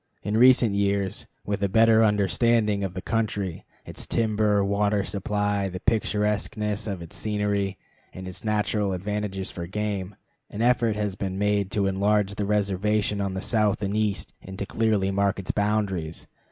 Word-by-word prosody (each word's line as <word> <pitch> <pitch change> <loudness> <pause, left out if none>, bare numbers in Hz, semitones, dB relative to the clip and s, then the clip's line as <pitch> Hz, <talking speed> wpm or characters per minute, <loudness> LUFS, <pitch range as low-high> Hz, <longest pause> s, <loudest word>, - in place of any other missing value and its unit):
In 105 +2 -1
recent 120 -2 +6
years, 100 -1 0 0.2
with 100 0 -2
a 100 - +2
better 115 +2 +5
understanding 105 +1 +2
of 90 -3 -4
the 95 - -5
country, 105 -6 -2 0.2
its - - -7
timber, 105 -3 +2
water 100 0 +1
supply, 100 0 -1
the 90 0 -6
picturesqueness 105 0 0
of 95 -4 -4
its 85 - -11
scenery, 105 -2 -1 0.3
and 95 0 -8
its 90 -1 -9
natural 105 -2 0
advantages 100 0 -3
for 85 -1 -6
game, 100 0 -3 0.3
an 110 - -3
effort 120 -3 +3
has 105 -2 -1
been 95 0 -4
made 100 -1 +1
to 100 -2 +1
enlarge 100 +1 +1
the 100 0 -2
reservation 105 0 +1
on 100 -1 -2
the 95 - -3
south 105 -3 +1
and 100 +1 -1
east 105 -2 -1
and 95 0 -9
to 100 - -3
clearly 105 -2 +1
mark 100 0 +1
its 95 - -2
boundaries. 100 -6 -1
105 Hz, 165 wpm, -25 LUFS, 95-105 Hz, 0.3 s, recent